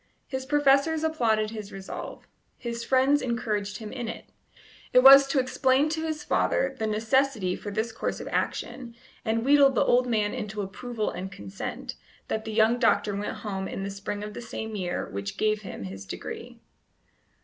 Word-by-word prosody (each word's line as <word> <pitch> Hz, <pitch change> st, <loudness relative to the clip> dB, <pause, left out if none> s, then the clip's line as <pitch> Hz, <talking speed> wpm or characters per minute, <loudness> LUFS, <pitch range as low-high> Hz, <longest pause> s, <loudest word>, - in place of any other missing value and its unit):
His 265 Hz, -1 st, -5 dB
professors 295 Hz, +2 st, +3 dB
applauded 225 Hz, -9 st, +1 dB
his 215 Hz, -2 st, -7 dB
resolve; 195 Hz, -1 st, -7 dB, 0.3 s
his 235 Hz, -2 st, -5 dB
friends 265 Hz, +3 st, +3 dB
encouraged 215 Hz, -4 st, -2 dB
him 215 Hz, -1 st, -8 dB
in 245 Hz, -3 st, -4 dB
it. -, -, -6 dB, 0.7 s
It 250 Hz, -, +7 dB
was 275 Hz, +1 st, +10 dB
to 275 Hz, 0 st, +1 dB
explain 260 Hz, +2 st, +2 dB
to 315 Hz, 0 st, -2 dB
his 310 Hz, -1 st, -3 dB
father 270 Hz, -2 st, +1 dB
the 220 Hz, -, 0 dB
necessity 220 Hz, -2 st, +1 dB
for 205 Hz, -, -7 dB
this 220 Hz, +3 st, -2 dB
course 225 Hz, -, -3 dB
of -, -, -7 dB
action, 240 Hz, -3 st, -3 dB, 0.3 s
and 225 Hz, +1 st, 0 dB
wheedle 280 Hz, 0 st, +7 dB
the 265 Hz, -, +1 dB
old 250 Hz, +1 st, +3 dB
man 215 Hz, -3 st, +1 dB
into 210 Hz, 0 st, -4 dB
approval 215 Hz, +3 st, -4 dB
and 190 Hz, +1 st, -6 dB
consent, 100 Hz, -, -6 dB, 0.4 s
that 220 Hz, -, -2 dB
the 220 Hz, -, -4 dB
young 225 Hz, +2 st, +3 dB
doctor 215 Hz, -3 st, +2 dB
went 205 Hz, +1 st, -3 dB
home 190 Hz, -2 st, -3 dB
in 195 Hz, -, -5 dB
the 200 Hz, -, -3 dB
spring 200 Hz, +1 st, -5 dB
of 210 Hz, 0 st, -6 dB
the -, -, -7 dB
same 220 Hz, -2 st, -6 dB
year 180 Hz, -3 st, -2 dB
which 100 Hz, 0 st, -5 dB
gave 215 Hz, 0 st, +1 dB
him 190 Hz, -, -7 dB
his 95 Hz, 0 st, -8 dB
degree. -, -, -7 dB
225 Hz, 180 wpm, -27 LUFS, 205-265 Hz, 0.7 s, was